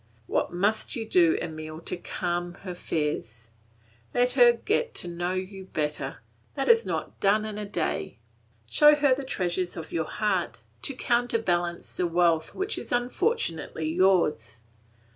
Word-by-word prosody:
What - - 0
must 200 +5 0
you 225 -2 -4
do, 170 -6 +4
Emile, 155 0 -6
to - - -3
calm 175 0 -3
her 185 -2 -5
fears? 120 -10 -3 0.7
Let 245 0 +3
her 245 -2 +7
get 430 - -1
to - - +2
know 175 +1 -2
you 190 +1 -5
better; 150 -4 -3 0.3
that - - -1
is 465 -1 +5
not - - -4
done 210 +2 +3
in 210 -1 -5
a 210 - -4
day. - - -2 0.5
Show 300 -1 +6
her 285 -2 +4
the 275 +2 -3
treasures 180 -7 -2
of 160 - -7
your 160 -1 -1
heart, 210 -1 -1 0.2
to 275 - -1
counterbalance 225 -9 0
the 180 - +1
wealth 170 -2 +2
which 390 +4 -2
is - - -8
unfortunately 245 - -1
yours. 175 - +2
185 Hz, 150 wpm, -27 LUFS, 170-240 Hz, 0.7 s, her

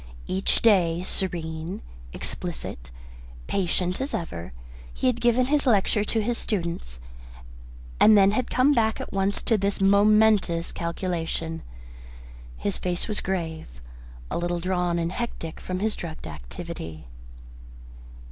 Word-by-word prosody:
Each 190 +1 0
day, 180 -6 +4
serene, 165 - -3 0.3
explicit, - - -5 0.6
patient 180 - 0
as 275 - -2
ever, 85 - -5 0.4
he - - -4
had 250 -2 +2
given 240 +1 +4
his 290 +1 +1
lecture 210 -2 +3
to 220 +1 0
his 240 +2 0
students, 170 - -3 1.0
and 215 -1 +8
then 195 0 +6
had 245 +3 -1
come 260 +4 +4
back 220 -3 +2
at - - -6
once 195 +1 0
to 225 -3 +2
this 200 +1 0
momentous 200 -3 +4
calculation. 170 -1 -3 1.0
His 80 +11 -2
face 180 -1 -1
was 210 -2 -1
grave, 165 -4 -3 0.6
a - - -1
little 175 0 -1
drawn 180 -1 0
and 170 0 -1
hectic 185 -7 -5
from 185 - -4
his 215 +3 0
drugged 165 -2 -7
activity. 80 - -7
185 Hz, 130 wpm, -26 LUFS, 165-215 Hz, 1.0 s, and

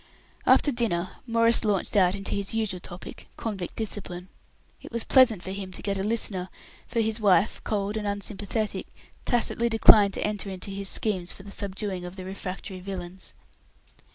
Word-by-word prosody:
After 290 - +5
dinner 200 -8 -1
Maurice 230 0 +4
launched 205 -2 0
out 185 -2 +4
into 195 0 -4
his 200 +2 -1
usual 215 -5 -1
topic 175 +1 -9
convict 195 -6 -4
discipline. 190 -4 -4 0.5
It - - -11
was 235 -1 -1
pleasant 235 -8 +5
for 190 - -5
him 195 -1 -5
to - - -7
get 200 -1 -1
a - - 0
listener; 195 -3 +1 0.4
for 230 -1 0
his 220 0 0
wife, 205 0 +3
cold 205 0 -1
and 210 -1 -3
unsympathetic, 205 +1 -2 0.4
tacitly 235 -1 +2
declined 215 -3 +6
to - - -2
enter 210 -1 -2
into 190 +1 -5
his 195 0 -3
schemes 185 -5 0
for 195 - -12
the 200 - -10
subduing 195 -2 -4
of 180 +1 -7
the 185 -1 -8
refractory 190 0 -6
villains. 185 -1 -7
200 Hz, 170 wpm, -26 LUFS, 185-220 Hz, 0.5 s, declined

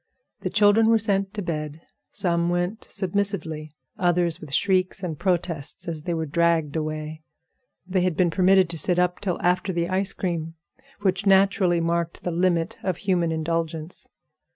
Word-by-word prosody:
The 185 - -3
children 205 +3 +4
were 225 - +5
sent 200 -2 0
to 205 - -3
bed. 155 -2 -4 0.3
Some 170 -1 0
went 175 +5 -2
submissively; 170 -6 -3 0.2
others 175 -2 +1
with 155 -3 -10
shrieks 185 +4 +1
and 160 -5 -4
protests 175 -2 -1
as 160 -2 -4
they 170 +2 -2
were 160 0 -2
dragged 165 -1 +1
away. 155 0 -4 0.6
They 185 0 0
had 180 -3 0
been 175 -2 +3
permitted 190 +1 +4
to 165 - -3
sit 180 +1 +3
up 180 0 +1
till 185 -4 -2
after 180 +2 +1
the 170 -1 -1
ice 190 +1 0
cream, 165 -3 -3 0.5
which 190 0 0
naturally 190 -2 +4
marked 170 0 -1
the 175 - -2
limit 175 +3 0
of 185 -3 -2
human 180 -4 0
indulgence. 160 0 -3
175 Hz, 160 wpm, -24 LUFS, 165-190 Hz, 0.6 s, were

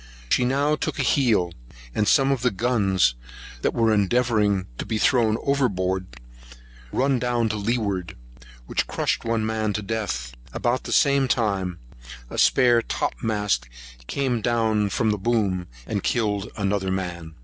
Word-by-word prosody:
She 125 - +3
now 140 +4 +2
took - - -3
a - - 0
heel, 110 - +2 0.4
and 105 - 0
some 135 0 +4
of 135 -3 0
the 125 - +3
guns 100 - +2 0.5
they - - +2
were 115 -1 +2
endeavouring 105 -2 +2
to 110 - -2
throw 110 -1 +3
over 140 0 +1
board 95 - -3 0.7
run 135 0 +1
down 120 -2 0
to 110 - -2
leeward, 100 -5 -2 0.5
which - - -1
crushed - - -1
one 115 -1 0
man 110 -1 -1
to 105 - -3
death; 100 - -3 0.2
about 120 +2 -1
the - - -5
same 140 -1 +4
time, 100 -7 0 0.5
a - - -3
spare 120 -3 +5
topmast 105 - -1 0.4
came 130 -4 -1
down 110 -2 +1
from 110 +2 +1
the 105 - -2
booms, 100 -5 0 0.2
and 100 +5 -2
killed 105 -3 0
another 100 -1 0
man. 90 -4 -4
110 Hz, 150 wpm, -24 LUFS, 95-120 Hz, 0.7 s, spare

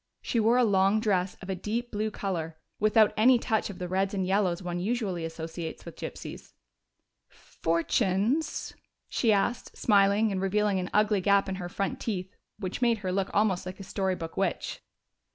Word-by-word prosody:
She 235 - 0
wore 225 +3 +4
a 250 - +5
long 200 -1 +3
dress 195 -4 0
of 185 - -8
a - - -1
deep 230 +6 -3
blue 215 +1 -1
color, 170 -6 -4 0.2
without 215 0 +4
any 245 +4 +6
touch 225 -2 0
of 195 - -7
the 180 - -4
reds 190 +2 0
and 190 -1 0
yellows 190 -2 +1
one 175 0 -3
usually 195 -4 -1
associates 165 0 -6
with - - -9
gypsies. - - -8 0.8
"Fortunes?" 195 - 0 0.4
she 230 - +2
asked, 215 +4 0
smiling, 205 0 +4
and 190 -1 -2
revealing 200 0 +1
an 180 - -3
ugly 210 -1 +3
gap 200 +1 +3
in 190 - -2
her 175 - -5
front 195 +2 -2
teeth, 190 -4 -4 0.2
which 195 +2 -5
made 235 -2 +3
her 185 - 0
look 195 +1 0
almost 200 -3 +2
like 185 +1 -7
a - - -6
story 190 -1 -1
book 165 -2 -7
witch. 190 -3 -2
195 Hz, 180 wpm, -28 LUFS, 185-215 Hz, 0.8 s, any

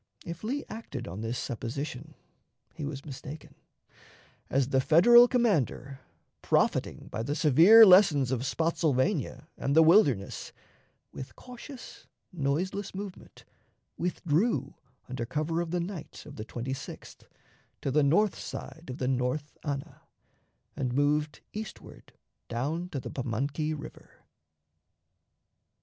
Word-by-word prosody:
If 170 +2 -7
Lee 270 +6 -2
acted 180 - -7
on 95 +5 -6
this 115 +2 -3
supposition, 140 +5 -5 0.6
he 150 - -6
was 140 -1 -6
mistaken, 145 +1 -9 1.0
as 135 0 +1
the 135 -1 +3
Federal 240 - +7
commander, 160 - 0 0.4
profiting - - 0
by 110 - -3
the 140 +6 -2
severe 165 - +8
lessons 180 - +6
of 130 -2 -1
Spottsylvania 160 +1 0
and 140 - 0
the 160 - +8
Wilderness, 150 - +3 0.6
with 130 - -9
cautious, 250 +1 -11 0.3
noiseless 180 +7 -2
movement, 195 -1 -9 0.5
withdrew 165 - 0 0.3
under 130 -1 -4
cover 155 +7 -1
of 170 - -4
the 175 +1 -1
night 175 -2 -7
of 145 - -11
the 110 - -6
26th 125 +3 -7 0.6
to 135 - -1
the 150 +3 +3
north 180 +9 +3
side 160 - -8
of 125 - -5
the 125 - -2
North 130 +3 -1
Anna, 140 -3 -5 0.7
and 125 -2 -2
moved 150 +1 +1
eastward 215 0 -9 0.4
down 150 +9 -2
to 145 - -4
the - - -7
Pamunkey 140 +5 -2
River. 145 - -12
150 Hz, 120 wpm, -29 LUFS, 130-175 Hz, 1.0 s, severe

